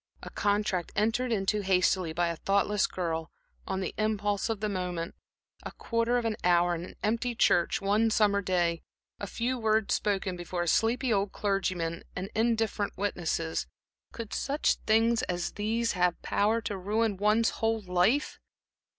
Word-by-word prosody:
A - - -8
contract 205 -4 0
entered 225 +4 +1
into 210 0 +1
hastily 185 -2 +2
by 170 +1 0
a 170 - -2
thoughtless 200 +3 +1
girl, 165 -3 -3 0.4
on 190 0 -2
the 185 - -3
impulse 205 -1 0
of 225 -2 -1
the 215 - -1
moment; 180 -4 -3 0.5
a - - -7
quarter 230 +1 0
of 240 - -1
an 220 -2 -1
hour 175 0 +4
in 170 0 -4
an - - -10
empty 235 +3 0
church 175 -5 +3
one 210 +3 +2
summer 205 -2 +3
day; 175 -3 0 0.4
a 200 - -4
few 245 +5 -2
words 220 -1 +2
spoken 195 -3 0
before 175 0 -3
a - - -5
sleepy 235 +6 +2
old 200 -1 0
clergyman 185 -5 -1
and 190 +3 -5
indifferent 225 -2 0
witnesses 160 - -2 0.4
could 225 -2 -7
such 285 +2 +1
things 225 +2 +3
as 175 -1 -2
these 225 +3 -1
have 180 -1 +1
power 220 +3 +1
to 210 - -3
ruin 210 +3 0
one's 210 +3 +2
whole 225 0 +1
life? 185 +9 +1
205 Hz, 160 wpm, -29 LUFS, 180-225 Hz, 0.5 s, hour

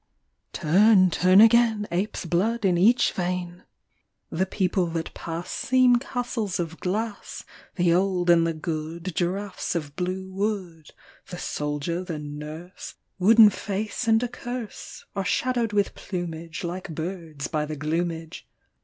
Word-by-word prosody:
TURN, 185 +3 +4
turn 185 +3 +5
again, 225 -2 +5
Ape's 185 +2 -2
blood 205 +6 0
in 180 -2 +3
each 220 +8 +4
vein! 180 -1 -4 0.7
The 185 +4 0
people 185 -2 0
that 165 -1 -4
pass 165 +1 -6
Seem 255 -1 +4
castles 240 -6 -3
of 165 -1 -4
glass, 210 +3 -4 0.3
The 175 -2 +3
old 180 -1 +1
and 165 -1 +4
the 165 - -1
good 165 +2 -4
Giraffes 185 +2 -2
of 150 -4 -4
blue 185 +1 -3
wood, 190 -6 -3 0.4
The 175 - -7
soldier, 150 +3 -3
the 170 -4 -5
nurse, 150 +4 -8 0.2
Wooden 215 +2 +7
face 205 +5 -3
and 225 +1 +4
a - - 0
curse, 245 -2 -7
Are 195 - -1
shadowed 240 +3 0
with 205 -1 +1
plumage 165 -3 -6
Like 180 +2 -5
birds, 160 -4 -5
by 150 -2 -2
the 155 - -4
gloomage. 165 +2 -3
180 Hz, 135 wpm, -25 LUFS, 165-205 Hz, 0.7 s, Wooden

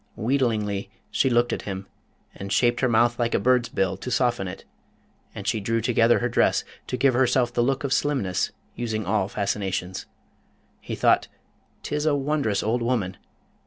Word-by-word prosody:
Wheedlingly 110 -5 0 0.2
she 135 - +2
looked 120 0 +2
at - - -3
him, 95 -1 -5 0.5
and 100 0 -7
shaped 120 +1 +3
her 130 - +2
mouth 120 +1 +3
like 120 -1 +1
a - - +3
bird's 125 -2 +2
bill 95 -1 0
to 125 - -6
soften 120 -6 +1
it; 90 - -8 0.7
and - - -7
she 110 - 0
drew 115 +3 0
together 115 0 +3
her 120 - 0
dress, 120 - +2 0.2
to 125 - -2
give 130 +1 +3
herself 125 -1 +2
the 120 - +1
look 135 +3 0
of 135 -1 0
slimness, 130 -12 0 0.2
using 110 -3 -3
all 95 0 +1
fascinations. 95 -3 -3 0.7
He - - -5
thought, - - +3 0.6
''Tis 150 +1 -1
a 150 - +3
wondrous 140 -7 0
old 115 +3 0
woman! 110 -6 -1
120 Hz, 170 wpm, -25 LUFS, 100-125 Hz, 0.7 s, shaped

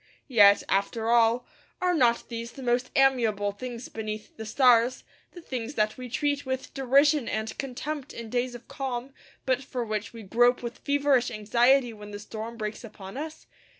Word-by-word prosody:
Yet, 205 -3 +7
after 220 +3 0
all, 235 +1 +4 0.3
are 360 -1 +2
not 240 -7 +2
these 235 0 -6
the 270 - -9
most 245 +1 +1
amiable 230 -7 +3
things 240 +3 -7
beneath 215 -1 -6
the 220 -1 -7
stars, 245 +1 +4 0.3
the 350 - -10
things 255 0 -5
that 215 0 +1
we 250 -1 -8
treat 285 +3 0
with 260 0 -4
derision 275 +1 +3
and 220 +1 -3
contempt 280 +2 -4
in 230 -2 -8
days 245 0 -1
of 240 0 -12
calm, 265 -1 -4 0.3
but 260 0 +1
for 250 -2 -4
which 215 0 -3
we 230 -2 -10
grope 240 +5 +3
with 235 0 -6
feverish 280 -3 +2
anxiety 240 +4 +3
when 210 -1 -11
the 205 - -6
storm 220 +2 -7
breaks 215 0 -5
upon 205 -2 -10
us? 310 +3 -6
240 Hz, 175 wpm, -27 LUFS, 220-265 Hz, 0.3 s, Yet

